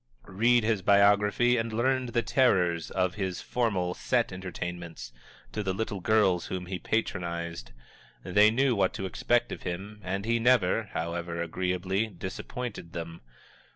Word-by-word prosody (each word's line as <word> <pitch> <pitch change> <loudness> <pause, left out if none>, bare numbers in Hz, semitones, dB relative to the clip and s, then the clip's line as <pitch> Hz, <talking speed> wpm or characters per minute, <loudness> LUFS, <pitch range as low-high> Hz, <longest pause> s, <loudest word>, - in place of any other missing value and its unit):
Read 115 +5 +3
his 110 -3 +1
biography 105 +5 +4
and 115 0 -1
learn 130 +3 +1
the 120 0 0
terrors 90 - +2
of 90 -1 0
his 95 -2 -3
formal, 100 -8 -1
set 120 +3 0
entertainments 90 -7 -6 0.4
to 105 - -3
the 95 -2 -2
little 105 -1 -3
girls 95 -3 +2
whom 90 -1 -4
he 90 0 -4
patronized! 85 - -3 0.5
They 105 +3 +5
knew 130 +3 +2
what 95 -2 +1
to 95 - -4
expect 120 +5 +1
of - - -6
him, 100 +4 -6
and 95 +2 -3
he 115 +1 +1
never, 115 -3 +3
however 85 +1 -3
agreeably, 90 +4 -1
disappointed 95 0 -6
them. 85 0 -6
95 Hz, 145 wpm, -28 LUFS, 90-115 Hz, 0.5 s, They